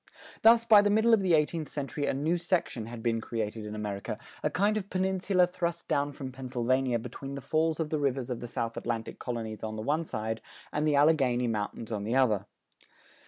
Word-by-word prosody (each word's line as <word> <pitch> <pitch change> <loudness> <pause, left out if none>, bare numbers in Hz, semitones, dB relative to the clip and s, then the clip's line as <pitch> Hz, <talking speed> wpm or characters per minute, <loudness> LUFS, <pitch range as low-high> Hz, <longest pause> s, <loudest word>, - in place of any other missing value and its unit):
Thus 230 +1 +6
by 215 -3 +8
the 205 - +2
middle 220 +3 +4
of 220 - +5
the 180 -3 +4
eighteenth 155 0 0
century 140 0 -3
a - - +1
new 160 +5 0
section 170 - -1
had 115 -1 -8
been 115 -1 +1
created 110 -1 -4
in 105 - -6
America, 105 0 -4 0.2
a - - +1
kind 205 +7 +2
of 200 -2 -3
peninsula 190 0 +2
thrust 170 -1 -3
down 145 +1 +1
from 135 -2 -7
Pennsylvania 130 -1 0
between 130 +4 -7
the - - -4
falls 160 +3 0
of 155 -2 -2
the 155 - 0
rivers 135 -3 -1
of 120 - -3
the 120 - -6
South 115 -1 -3
Atlantic 115 -1 -3
colonies 115 -3 -4
on 110 0 -4
the 110 - -4
one 155 +6 +1
side 110 -5 -4 0.3
and 150 +1 +1
the 150 - +3
Alleghany 135 -5 +3
mountains 110 0 -3
on 105 -2 -2
the 115 +4 -1
other. 110 -7 +2
135 Hz, 210 wpm, -29 LUFS, 115-165 Hz, 0.3 s, by